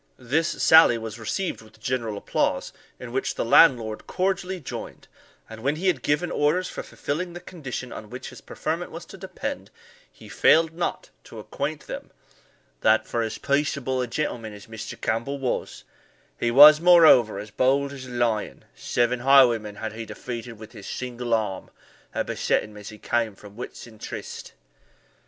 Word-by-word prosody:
This 155 Hz, +7 st, 0 dB, 0.2 s
sally 160 Hz, -7 st, +7 dB
was 110 Hz, 0 st, -7 dB
received 175 Hz, -, -3 dB
with 110 Hz, 0 st, -18 dB
general 115 Hz, -3 st, -2 dB
applause, -, -, -1 dB, 0.3 s
in 125 Hz, -2 st, -8 dB
which 135 Hz, +2 st, -2 dB
the -, -, -2 dB
landlord 115 Hz, -4 st, +4 dB
cordially 185 Hz, 0 st, -1 dB
joined; 145 Hz, -, -8 dB, 0.4 s
and 110 Hz, 0 st, -10 dB
when 140 Hz, +5 st, 0 dB
he 170 Hz, +5 st, -5 dB
had 175 Hz, -9 st, +2 dB
given 150 Hz, +6 st, 0 dB
orders 165 Hz, +5 st, +1 dB
for -, -, -6 dB
fulfilling 170 Hz, +5 st, -4 dB
the 175 Hz, -, -7 dB
condition 135 Hz, -8 st, -7 dB
on 105 Hz, -, -9 dB
which 125 Hz, +1 st, -7 dB
his -, -, -13 dB
preferment -, -, -4 dB
was -, -, -9 dB
to -, -, -12 dB
depend, -, -, -6 dB, 0.4 s
he -, -, -15 dB
failed 160 Hz, 0 st, +4 dB
not 175 Hz, +1 st, -3 dB
to -, -, -12 dB
acquaint -, -, -5 dB
them, -, -, -7 dB, 0.7 s
"that, 110 Hz, -, +3 dB
for 115 Hz, -, -1 dB
as 110 Hz, -1 st, -3 dB
peaceable 140 Hz, -2 st, 0 dB
a 125 Hz, -, -2 dB
gentleman 115 Hz, -4 st, -3 dB
as 105 Hz, -1 st, -12 dB
Mr. 110 Hz, 0 st, -8 dB
Campbell 115 Hz, +5 st, -2 dB
was, 130 Hz, -3 st, -3 dB, 0.6 s
he 120 Hz, -, +1 dB
was, 150 Hz, +5 st, +9 dB
moreover, 160 Hz, -, +6 dB
as 105 Hz, +1 st, -7 dB
bold 140 Hz, +3 st, +1 dB
as 130 Hz, -2 st, -9 dB
a -, -, -10 dB
lion 120 Hz, -3 st, -1 dB
seven 120 Hz, 0 st, 0 dB
highwaymen 120 Hz, -5 st, +4 dB
had 110 Hz, +1 st, -5 dB
he 115 Hz, +1 st, -6 dB
defeated 120 Hz, +1 st, -7 dB
with 110 Hz, 0 st, -12 dB
his 105 Hz, -5 st, -11 dB
single 125 Hz, -1 st, -5 dB
arm, 105 Hz, -5 st, -1 dB, 0.4 s
that -, -, -2 dB
beset -, -, 0 dB
him 105 Hz, 0 st, -12 dB
as 105 Hz, -1 st, -9 dB
he 110 Hz, -, -11 dB
came 115 Hz, -2 st, -1 dB
from 105 Hz, 0 st, -14 dB
Whitson 115 Hz, -2 st, -9 dB
Tryste." -, -, -7 dB
125 Hz, 170 wpm, -25 LUFS, 110-145 Hz, 0.7 s, was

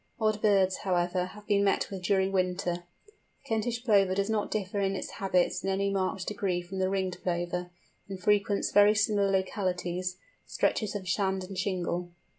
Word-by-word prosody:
Odd 215 Hz, -1 st, +1 dB
birds, 195 Hz, -3 st, +3 dB
however, 180 Hz, -1 st, 0 dB
have 210 Hz, +3 st, -12 dB
been 205 Hz, -2 st, +2 dB
met 200 Hz, -, +1 dB
with 190 Hz, -2 st, -5 dB
during 190 Hz, +1 st, +2 dB
winter. 180 Hz, -2 st, -1 dB, 0.2 s
The 420 Hz, -, -23 dB, 0.3 s
Kentish 230 Hz, -1 st, -1 dB
Plover 200 Hz, -5 st, +4 dB
does 200 Hz, +2 st, 0 dB
not 210 Hz, -2 st, 0 dB
differ 205 Hz, -1 st, -2 dB
in 195 Hz, 0 st, 0 dB
its -, -, -5 dB
habits 185 Hz, -2 st, 0 dB
in 195 Hz, -, -1 dB
any 200 Hz, +1 st, 0 dB
marked 190 Hz, -1 st, -1 dB
degree 200 Hz, -4 st, -1 dB
from 190 Hz, +2 st, -6 dB
the 185 Hz, 0 st, +1 dB
Ringed 190 Hz, -2 st, -2 dB
Plover, 175 Hz, 0 st, -2 dB, 0.4 s
and 195 Hz, -1 st, -6 dB
frequents 205 Hz, +1 st, +1 dB
very 205 Hz, +1 st, +6 dB
similar 205 Hz, -2 st, +2 dB
localities, 185 Hz, -2 st, -1 dB, 0.3 s
stretches 215 Hz, -2 st, 0 dB
of 190 Hz, -2 st, -5 dB
sand 190 Hz, 0 st, 0 dB
and 190 Hz, +1 st, -8 dB
shingle. 180 Hz, -2 st, -2 dB
195 Hz, 175 wpm, -29 LUFS, 185-205 Hz, 0.4 s, very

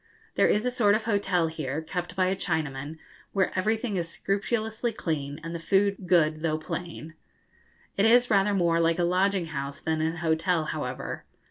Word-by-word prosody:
There -, -, +4 dB
is 210 Hz, +3 st, +2 dB
a 250 Hz, -, +1 dB
sort 210 Hz, -5 st, +3 dB
of 220 Hz, -, -1 dB
hotel 195 Hz, -5 st, +1 dB
here, 155 Hz, -3 st, -3 dB
kept 175 Hz, +2 st, -5 dB
by 185 Hz, -1 st, +2 dB
a 185 Hz, +1 st, +1 dB
Chinaman, 155 Hz, -5 st, -3 dB, 0.4 s
where 190 Hz, -2 st, +2 dB
everything 215 Hz, +2 st, 0 dB
is 170 Hz, -1 st, -2 dB
scrupulously 220 Hz, +5 st, -1 dB
clean, 150 Hz, -8 st, -3 dB
and 165 Hz, 0 st, -5 dB
the 170 Hz, -, -4 dB
food 195 Hz, +2 st, +1 dB
good 155 Hz, -3 st, +3 dB
though 155 Hz, -1 st, 0 dB
plain. 160 Hz, 0 st, -6 dB, 0.8 s
It 200 Hz, +3 st, +4 dB
is 245 Hz, +1 st, +5 dB
rather 200 Hz, 0 st, +3 dB
more 170 Hz, -3 st, +2 dB
like 165 Hz, 0 st, +2 dB
a 175 Hz, -, +1 dB
lodging 185 Hz, +1 st, +2 dB
house 140 Hz, 0 st, -4 dB
than 160 Hz, -1 st, -1 dB
an 160 Hz, +1 st, 0 dB
hotel, 165 Hz, 0 st, +1 dB
however. 145 Hz, -5 st, -4 dB
175 Hz, 175 wpm, -27 LUFS, 160-200 Hz, 0.8 s, is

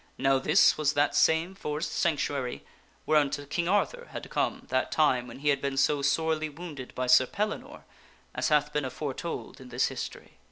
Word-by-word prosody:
(Now 135 Hz, 0 st, +3 dB
this 150 Hz, +4 st, +4 dB
was 150 Hz, 0 st, +2 dB
that 145 Hz, 0 st, +2 dB
same 160 Hz, +3 st, +3 dB
forest 150 Hz, -4 st, -4 dB
sanctuary 145 Hz, -5 st, -1 dB, 0.4 s
whereunto 145 Hz, -2 st, +2 dB
King 170 Hz, +4 st, -2 dB
Arthur 480 Hz, -, 0 dB
had -, -, -6 dB
come -, -, -1 dB
that -, -, 0 dB
time 130 Hz, -6 st, +2 dB
when 115 Hz, -, -10 dB
he 145 Hz, +2 st, 0 dB
had 140 Hz, -, +2 dB
been 140 Hz, -1 st, -2 dB
so 140 Hz, +1 st, +2 dB
sorely 155 Hz, +2 st, +1 dB
wounded 150 Hz, -4 st, -9 dB
by 130 Hz, -, -1 dB
Sir 125 Hz, 0 st, +6 dB
Pellinore 230 Hz, -, -4 dB, 0.5 s
as -, -, -1 dB
hath 150 Hz, -1 st, +2 dB
been 150 Hz, -, 0 dB
aforetold 135 Hz, +2 st, -5 dB
in 130 Hz, -, -11 dB
this 125 Hz, +1 st, +1 dB
history.) -, -, -8 dB
150 Hz, 175 wpm, -28 LUFS, 135-160 Hz, 0.5 s, Sir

